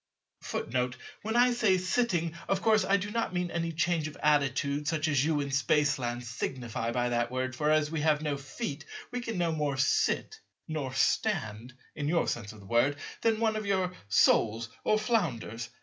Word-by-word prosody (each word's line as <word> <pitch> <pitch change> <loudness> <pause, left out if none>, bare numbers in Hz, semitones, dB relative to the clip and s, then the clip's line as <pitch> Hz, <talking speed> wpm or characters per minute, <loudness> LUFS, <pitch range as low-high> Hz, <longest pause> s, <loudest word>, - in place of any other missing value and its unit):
When 220 +2 -3
I 245 +1 +5
say 220 -6 +3
"sitting," 185 -3 0
of 195 -1 0
course 220 -1 +4
I 200 - +3
do 205 +2 -4
not 230 -5 -1
mean 180 -1 -1
any 165 0 -1
change 165 0 0
of 155 - -9
attitude 145 0 +2
such 160 0 0
as 145 -3 +2
you 150 -1 +1
in 140 -1 -4
Spaceland 135 -2 +1
signify 120 -1 -3
by 120 0 0
that 120 0 0
word; 130 0 -2
for 150 +4 0
as 155 -1 +3
we 160 -2 -1
have 155 0 +2
no 150 -2 0
feet, 140 +1 -5 0.3
we 250 0 -3
can 230 -4 -4
no 170 -2 +1
more 150 -3 -1
"sit" 285 - +1 0.3
nor 150 -5 -3
"stand" 130 - 0 0.2
(in 145 -1 -3
your 170 +2 +2
sense 110 -3 -3
of 110 -1 -13
the - - -14
word) 120 +7 +2 0.3
than 225 -1 +2
one 220 -1 +2
of 215 -1 -3
your 190 -2 +1 0.2
soles 115 +2 +3
or 215 - +3
flounders. 145 - -1
150 Hz, 185 wpm, -30 LUFS, 130-185 Hz, 0.3 s, I